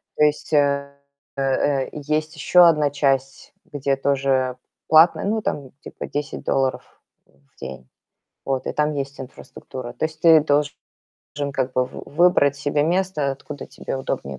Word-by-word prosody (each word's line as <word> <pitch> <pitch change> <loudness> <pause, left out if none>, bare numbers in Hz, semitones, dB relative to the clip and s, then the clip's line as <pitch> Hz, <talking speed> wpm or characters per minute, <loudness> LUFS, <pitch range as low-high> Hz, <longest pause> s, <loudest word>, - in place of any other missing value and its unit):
То - - +2
есть, 150 +1 0
э 140 -1 +2 0.4
э - - -1
э, 135 0 0
есть 155 +1 -2
еще 180 -1 +5
одна 150 -3 +3
часть, 135 -1 -1 0.2
где 140 -1 0
тоже 135 -2 0 0.3
платное, 160 +4 +5
ну, 215 +2 0
там 135 -8 -4
типа - - -8
10 145 0 -5
долларов 135 -1 -2 0.2
в 70 0 -32
день, 65 -1 -8 0.6
вот, 135 -1 -2
и - - -2
там 150 0 0
есть 140 0 -5
инфраструктура. 130 -1 -9
То - - -3
есть 155 0 -14
ты 165 -2 +7
должен 145 -1 +1 0.8
как 130 -1 -2
бы 130 0 +2
в - - -10
выбрать 150 -4 +4
себе 145 +1 0
место, 175 -4 0
откуда 140 +1 -9
тебе - - -6
удобнее 70 - -4
140 Hz, 155 wpm, -22 LUFS, 135-150 Hz, 0.8 s, ты